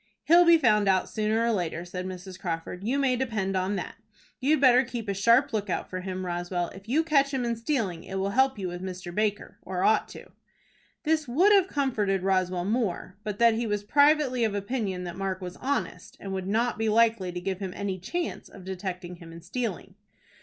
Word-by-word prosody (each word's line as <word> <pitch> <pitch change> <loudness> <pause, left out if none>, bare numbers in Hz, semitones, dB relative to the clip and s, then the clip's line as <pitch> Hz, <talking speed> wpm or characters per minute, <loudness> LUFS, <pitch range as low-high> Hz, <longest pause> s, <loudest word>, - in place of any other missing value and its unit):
"He'll 345 +2 +6
be 335 0 +7
found 210 -8 +3
out 190 -1 +2
sooner 220 +2 +1
or 235 - +2
later," 175 -4 -2
said 180 +1 -5
Mrs. 185 0 -8
Crawford. 175 +1 -4
"You 245 +6 0
may 270 -3 +2
depend 220 -7 -2
on 185 +2 0
that. 185 - -5 0.4
You'd 295 +4 +2
better 255 -1 +6
keep 235 -3 -6
a 200 - 0
sharp 230 +7 +3
lookout 205 -4 -2
for 185 0 -4
him, 185 0 -4
Roswell. 175 0 -2
If 195 +3 -13
you 305 +6 +3
catch 280 -4 +3
him 260 -3 -1
in 235 0 0
stealing, 225 - -2
it 190 - -7
will 195 +1 -1
help 265 +2 +3
you 190 -2 -3
with 175 0 -6
Mr. 185 -2 -6
Baker, 210 +1 -2
or 185 -1 -3
ought 220 - +3
to." - - -12 0.7
This 310 -2 +1
would 345 +12 +4
have 390 -3 +5
comforted 215 - 0
Roswell 185 -2 +1
more, 205 -4 -2
but 210 -2 -4
that 235 0 +5
he 230 +1 -1
was 210 -1 -1
privately 285 0 +3
of 215 -2 0
opinion 200 -3 -2
that 175 0 -6
Mark 190 -1 -2
was 180 -2 -7
honest, 280 +2 -3
and 195 -1 -6
would 190 -1 -3
not 225 +3 0
be 225 0 +1
likely 220 -4 +3
to 180 - -5
give 190 +1 -3
him 190 -2 -4
any 195 -2 -3
chance 345 - -4
of 190 -3 -13
detecting 185 -2 -5
him 170 -1 -12
in 165 0 -11
stealing. 195 -1 -4
205 Hz, 210 wpm, -27 LUFS, 185-245 Hz, 0.7 s, be